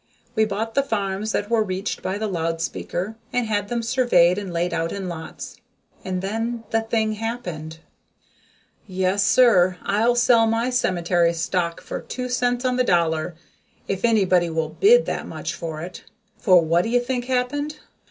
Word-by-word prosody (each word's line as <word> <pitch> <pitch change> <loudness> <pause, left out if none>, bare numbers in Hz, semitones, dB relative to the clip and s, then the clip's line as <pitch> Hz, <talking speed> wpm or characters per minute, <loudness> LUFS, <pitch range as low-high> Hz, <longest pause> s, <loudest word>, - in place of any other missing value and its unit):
We 220 -2 +3
bought 215 +2 -3
the 275 - +3
farms 210 -4 -2
that 205 - -1
were 230 -1 +3
reached 195 0 -3
by 190 +2 -2
the 220 - -2
loud 165 -4 -2
speaker 190 +5 -4
and 245 -1 0
had 205 -2 -1
them 235 +1 -2
surveyed 225 -7 +3
and 195 -3 -6
laid 170 +1 -1
out 165 0 -1
in 195 -2 -4
lots 160 -2 -7 0.5
and 185 0 -3
then 225 +3 -2
the 225 - +2
thing 225 -1 0
happened! 185 -9 -5 1.1
Yes, 190 +1 +1
sir, 195 -6 +4
I'll 225 +4 +2
sell 240 -2 +4
my 230 +3 0
cemetery 175 -7 +1
stock 170 0 -2
for - - -6
two 250 0 -5
cents 245 0 0
on 250 -1 +1
the 255 - +3
dollar, 170 -4 +1 0.5
if 195 -1 -3
anybody 185 -7 +3
will 160 -1 -1
bid 465 - +5
that - - -3
much - - -5
for 160 -2 -6
it. 180 +1 -9 0.3
For 185 -2 +5
what 165 +2 +3
do 225 - -3
you 245 +1 +3
think 245 0 -2
happened? 260 +4 -1
205 Hz, 170 wpm, -23 LUFS, 175-235 Hz, 1.1 s, bid